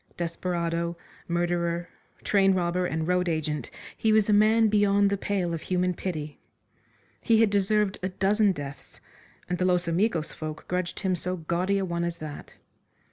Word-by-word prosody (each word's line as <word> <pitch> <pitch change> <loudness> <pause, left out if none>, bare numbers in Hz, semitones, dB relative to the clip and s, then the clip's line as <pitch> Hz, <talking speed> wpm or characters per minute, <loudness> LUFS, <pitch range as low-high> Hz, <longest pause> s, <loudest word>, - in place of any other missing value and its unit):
Desperado, 170 0 -2 0.3
murderer, 170 0 -1 0.4
train 195 -2 +3
robber 180 0 0
and 160 -1 -2
road 180 0 +1
agent, 155 -2 -2 0.3
he 220 - +1
was 215 -1 +4
a 210 - +3
man 220 +2 +5
beyond 205 -1 +3
the - - +2
pale 190 -3 -1
of 165 - -3
human 180 0 0
pity. 155 -5 -5 0.8
He 225 -2 +3
had 225 -2 +4
deserved 205 0 +1
a 185 - -1
dozen 200 +2 +2
deaths, 145 -5 -8 0.5
and 180 0 -2
the 185 - +2
Los 180 -1 +2
Amigos 170 -2 0
folk 155 0 -7
grudged 180 -1 -2
him 190 -3 +1
so 180 +2 -2
gaudy 175 +4 0
a 195 - 0
one 170 -1 -2
as 170 0 -2
that. 155 -3 -9
180 Hz, 165 wpm, -27 LUFS, 170-200 Hz, 0.8 s, man